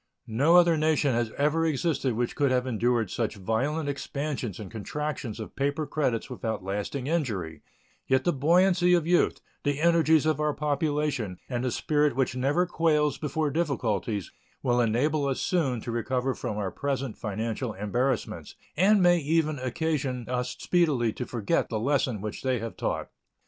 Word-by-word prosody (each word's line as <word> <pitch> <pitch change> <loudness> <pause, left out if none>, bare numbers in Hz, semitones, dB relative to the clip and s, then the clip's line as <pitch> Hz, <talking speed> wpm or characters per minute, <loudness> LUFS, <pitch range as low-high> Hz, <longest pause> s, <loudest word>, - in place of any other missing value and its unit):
No 135 +9 +3
other 170 -2 +6
nation 155 -3 +2
has 120 -1 0
ever 150 +3 +2
existed 155 -4 0
which 120 +1 -1
could 140 -2 +2
have 125 0 +1
endured 120 -3 0
such 115 -2 -2
violent 130 +10 -1
expansions 140 - -3
and 105 -3 -8
contractions 120 +1 -4
of 110 - -8
paper 145 +3 -1
credits 130 -7 -1
without 115 -6 -4
lasting 105 +7 -3
injury; 105 - -2 0.5
yet 130 0 +3
the 175 - +2
buoyancy 180 +5 +4
of 170 -3 +1
youth, 175 +1 +2 0.2
the 145 -1 0
energies 160 -2 +4
of 155 -2 +1
our 150 -1 0
population, 145 - -1
and 120 -1 -2
the 130 - +1
spirit 145 +2 +1
which 130 -1 0
never 140 +8 +2
quails 155 -4 +1
before 150 0 -1
difficulties 115 - -1 0.3
will 120 -1 +2
enable 140 +6 +1
us 135 - -1
soon 145 - 0
to 120 - -5
recover 125 +3 -1
from 105 - -4
our 100 -3 -2
present 135 -4 -3
financial 110 +2 -3
embarrassments, 120 +6 -2 0.2
and 195 +3 +4
may 175 0 +5
even 155 -1 +1
occasion 130 -1 -2
us 125 0 -2
speedily 145 -11 +2
to 125 - -5
forget 110 -5 0
the 110 - -2
lesson 130 -3 0
which 105 0 -5
they 130 -1 +1
have 115 0 -5
taught. - - -3
135 Hz, 165 wpm, -27 LUFS, 115-155 Hz, 0.5 s, other